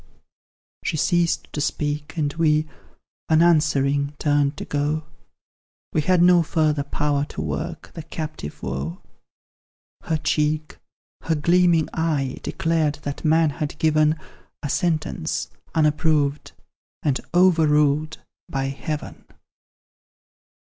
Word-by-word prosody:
She 160 - -1
ceased 170 +2 +1
to 150 - -2
speak, 145 +1 -2
and 145 -2 0
we, 155 -1 +2 0.6
unanswering, 150 -3 +3
turned 145 -1 +1
to - - -5
go 150 +2 -1 0.9
We 155 - +2
had 180 +2 +3
no 175 -1 +6
further 155 -2 +1
power 145 0 0
to - - -9
work 165 0 -5
the 165 - -6
captive 155 - -7
woe: 70 +7 -4 1.1
Her 160 - 0
cheek, 150 0 -1 0.5
her 165 - +1
gleaming 170 +1 +3
eye, 150 -5 -1
declared 160 -3 0
that 145 0 -5
man 160 -1 +3
had 150 0 -4
given 155 0 +3 0.5
A 145 - -2
sentence, 160 0 -1 0.2
unapproved, 150 -2 +1 0.5
and 140 -3 +1 0.2
overruled 155 -4 +3 0.3
by 135 0 -1
Heaven. 150 +2 -5
155 Hz, 105 wpm, -23 LUFS, 145-160 Hz, 1.1 s, no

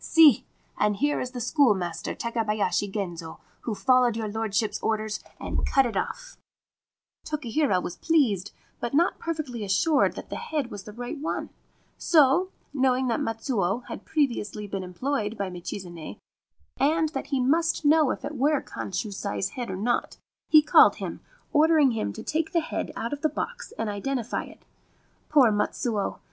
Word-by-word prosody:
See! 315 -7 +6 0.3
And 210 0 +2
here 290 +7 +1
is 250 - -3
the 250 -1 -7
schoolmaster 215 - +1
Take 235 0 -4
bayashi 205 -4 0
Genzo, 175 -5 -5 0.2
who 225 - -3
followed 250 -1 +3
your 220 -1 -2
lordship's 210 -1 -1
orders 215 -1 -1 0.2
and - - -2
cut 270 -1 +3
it 230 -4 -3
off/ - - -4 0.9
Tokihira 285 -8 0
was 175 - -5
pleased, 240 - +2 0.3
but 240 +3 -3
not 340 +5 +2
perfectly 300 -9 -4
assured 280 - +2
that - - -9
the - - -3
head 305 - -3
was 200 -2 -8
the 210 - -8
right 245 +7 -6
one: 310 - -3 0.5
so, 325 +3 +4 0.2
knowing 260 -2 +2
that 230 - +1
Matsuo 225 -2 -1
had - - -6
previously 235 -8 -1
been 195 -1 -4
employed 215 +4 -2
by 195 -3 -3
Michizane, 175 -2 -7 0.6
and 315 +3 +3
that 315 - -5
he 275 -3 0
must 320 +5 +1
know 305 -1 +5
if - - -3
it 295 +1 -5
were 285 +2 +2
Kanshusai's 195 -1 -4
head 245 -4 -5
or 190 - -3
not, 240 +5 -1 0.3
he 310 -1 +7
called 305 - +7
him, - - -5 0.3
ordering 310 -3 +5
him 220 - -2
to - - -8
take 320 +1 -1
the 335 - +3
head 320 - -4
out 230 +4 -3
of 290 - -5
the 310 - +2
box - - -5
and 225 - -2
identify 235 +4 -2
it. - - -16 0.6
Poor 270 -7 +6
Matsuo 210 0 -1
240 Hz, 165 wpm, -26 LUFS, 205-295 Hz, 0.9 s, he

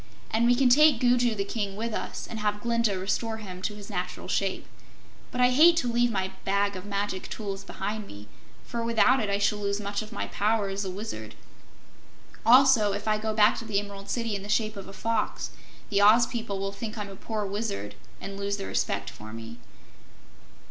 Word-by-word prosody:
"And 230 +2 +3
we 245 - +5
can 265 +1 +4
take 290 0 +6
Gugu 245 -2 +3
the 200 - -1
King 200 -1 -3
with 225 +2 -3
us, - - -4
and 225 - -6
have 210 0 0
Glinda 230 -4 +1
restore 220 +4 -1
him 185 -4 -8
to 210 +2 -2
his 205 -1 -10
natural 180 -3 -4
shape. 195 -1 -1 0.6
But 250 - -2
I 250 0 +5
hate 330 +6 +7
to 245 -6 +1
leave 240 +1 +3
my 190 -3 -1
Bag 200 +1 +1
of 185 +1 -7
Magic 200 -2 -3
Tools 195 -3 -5
behind 205 +2 -4
me, 100 +1 -11 0.4
for 235 -1 -3
without 235 +3 +4
it 215 -3 -1
I 200 - +1
shall 205 +1 +1
lose 200 0 -1
much 200 0 -3
of 215 +1 -9
my - - -3
power 210 -1 +1
as 195 +1 -3
a 190 - -3
Wizard. 180 - -6 1.1
Also, 245 -4 +6
if 205 +2 -5
I 215 0 +2
go 220 0 -1
back 215 0 +5
to 230 - -8
the 215 -3 -1
Emerald 200 -1 -8
City 230 -3 -1
in 200 - -4
the 205 - -9
shape 215 0 +1
of 195 -1 -8
a - - -9
Fox, 225 +2 -2 0.4
the 200 0 +3
Oz 220 +4 +7
people 225 -4 -4
will 195 0 -2
think 220 +2 -6
I'm 205 -1 -4
a 195 - -9
poor 215 +1 -3
Wizard 195 - -3 0.3
and 195 - -6
will 200 0 -5
lose 200 0 -1
their 195 - -5
respect 100 0 -1
for 110 +1 -11
me." 115 +1 -8
210 Hz, 215 wpm, -27 LUFS, 195-230 Hz, 1.1 s, hate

